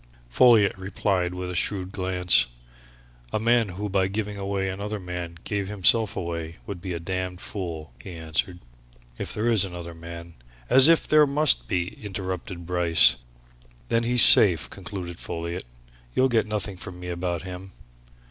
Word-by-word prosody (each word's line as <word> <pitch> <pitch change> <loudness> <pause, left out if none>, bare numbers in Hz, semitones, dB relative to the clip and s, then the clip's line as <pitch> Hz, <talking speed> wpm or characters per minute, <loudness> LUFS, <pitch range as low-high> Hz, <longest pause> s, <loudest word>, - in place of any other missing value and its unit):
Folliot 110 - +4
replied 95 -2 -2
with 90 0 -5
a - - -6
shrewd 95 0 -2
glance. 90 -7 +2 0.8
"A - - -1
man 115 -1 +2
who 100 +4 -5
by 95 -1 0
giving 105 +1 -4
away 100 -1 -3
another 100 +3 -5
man 90 -2 -7
gave 100 -2 -3
himself 105 +2 +2
away 85 -2 -5
would 95 -4 -7
be 95 -1 -5
a 85 - -4
damned 90 +1 -4
fool!" 80 - -7
he 90 - -10
answered. 80 +2 -3 0.6
"If - - -4
there 110 +2 -2
is 115 -5 +4
another 90 -3 -7
man 85 0 -10 0.2
" - - -27
"As 135 +2 +8
if 165 -1 +4
there 155 -1 +5
must 140 - +2
be!" 90 +3 -4
interrupted 95 -2 -6
Bryce. 85 -6 +4 0.7
"Then 115 - +1
he's 120 +1 +7
safe!" 90 -7 +7
concluded 90 -2 -8
Folliot. 85 0 -5 0.5
"You'll 130 +1 +3
get 110 -3 +1
nothing 105 -2 -2
from 90 0 -10
me 90 0 -7
about 85 -1 -3
him!" 95 +1 -9
95 Hz, 160 wpm, -24 LUFS, 85-105 Hz, 0.8 s, As